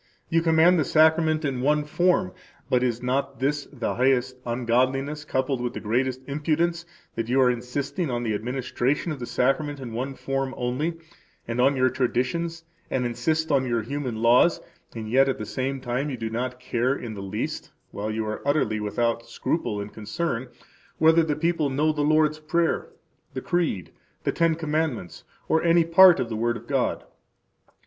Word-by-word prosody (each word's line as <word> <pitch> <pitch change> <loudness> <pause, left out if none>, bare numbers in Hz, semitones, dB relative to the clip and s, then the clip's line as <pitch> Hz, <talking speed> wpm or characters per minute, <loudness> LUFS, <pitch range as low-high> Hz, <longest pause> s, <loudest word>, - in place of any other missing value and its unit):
] - - -41
You 165 0 +3
command 165 +2 +4
the - - +3
Sacrament 155 +1 +3
in 130 -3 -2
one 150 +3 +2
form 160 - +1 0.4
[but 125 - +3
is 120 -1 -1
not 135 +2 -1
this 145 +2 -1
the 125 -5 -3
highest 130 0 +2
ungodliness 130 +5 0
coupled 130 -2 -1
with 125 -1 -2
the - - -5
greatest 125 +4 -1
impudence 165 +4 -1 0.3
that 115 0 -3
you 130 +2 +2
are 125 -1 +5
insisting 135 +7 -3
on 120 -1 -2
the 110 -2 -1
administration 125 - -1
of 150 - -5
the 120 - -5
Sacrament 145 +3 0
in 125 -4 -7
one 130 +4 -3
form 135 0 -3
only, 130 +7 -1 0.5
and 120 +1 -1
on 135 +2 +4
your 130 -1 +2
traditions] 135 +7 -1 0.3
and 125 -1 -1
insist 155 +7 -1
on 135 -2 +2
your 120 -2 0
human 125 -3 -4
laws, 125 +8 +5 0.4
and 110 -1 -5
yet 135 +4 +4
at 135 - -1
the 105 - -5
same 135 +4 -3
time 130 +3 -2
you 130 - -4
do 115 -1 -4
not 125 +2 -3
care 125 +1 0
in 115 -5 -6
the 100 - -7
least 100 +2 -4 0.2
[while 105 +2 -4
you 110 0 -2
are 110 0 -4
utterly 140 -7 +1
without 115 +2 -1
scruple 115 -3 -2
and 100 +1 -6
concern] 115 +4 -3 0.5
whether 160 +1 +5
the 155 -2 0
people 165 -2 0
know 150 +4 +1
the 150 -1 -2
Lord's 155 +1 +3
Prayer, 165 +2 0 0.5
the - - -1
Creed, 165 - -1 0.3
the - - +1
Ten 165 -1 +2
Commandments, 155 - -3 0.2
or 160 - +2
any 170 0 +4
part 170 0 +7
of 125 - -1
the 115 - -4
Word 120 +2 0
of - - -13
God. - - -1
130 Hz, 185 wpm, -25 LUFS, 120-155 Hz, 0.5 s, part